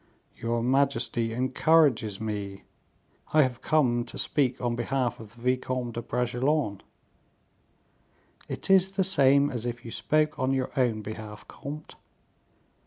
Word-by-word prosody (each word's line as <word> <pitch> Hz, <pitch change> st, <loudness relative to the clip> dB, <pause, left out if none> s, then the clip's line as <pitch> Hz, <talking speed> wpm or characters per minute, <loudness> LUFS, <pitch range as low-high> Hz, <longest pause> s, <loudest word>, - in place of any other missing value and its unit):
"Your 115 Hz, 0 st, -2 dB
majesty 130 Hz, -3 st, +1 dB
encourages 130 Hz, -3 st, +2 dB
me. 100 Hz, -3 st, -5 dB, 0.7 s
I 155 Hz, -1 st, +6 dB
have 125 Hz, -2 st, -3 dB
come 125 Hz, -6 st, +2 dB
to -, -, -9 dB
speak 130 Hz, -3 st, +1 dB
on 120 Hz, -1 st, -1 dB
behalf 120 Hz, 0 st, -1 dB
of 110 Hz, 0 st, -12 dB
the 120 Hz, -, -16 dB
Vicomte 125 Hz, -1 st, -1 dB
de 120 Hz, -, -4 dB
Bragelonne." 125 Hz, -1 st, -1 dB, 1.7 s
"It -, -, -3 dB
is 190 Hz, 0 st, +5 dB
the 195 Hz, 0 st, +1 dB
same 140 Hz, -5 st, +4 dB
as 120 Hz, -3 st, -4 dB
if 120 Hz, 0 st, -5 dB
you 115 Hz, -, -7 dB
spoke 155 Hz, +3 st, 0 dB
on 130 Hz, +1 st, +1 dB
your 130 Hz, -1 st, -1 dB
own 115 Hz, -5 st, +1 dB
behalf, 110 Hz, 0 st, -8 dB
comte." 150 Hz, +2 st, -9 dB
125 Hz, 135 wpm, -27 LUFS, 115-140 Hz, 1.7 s, I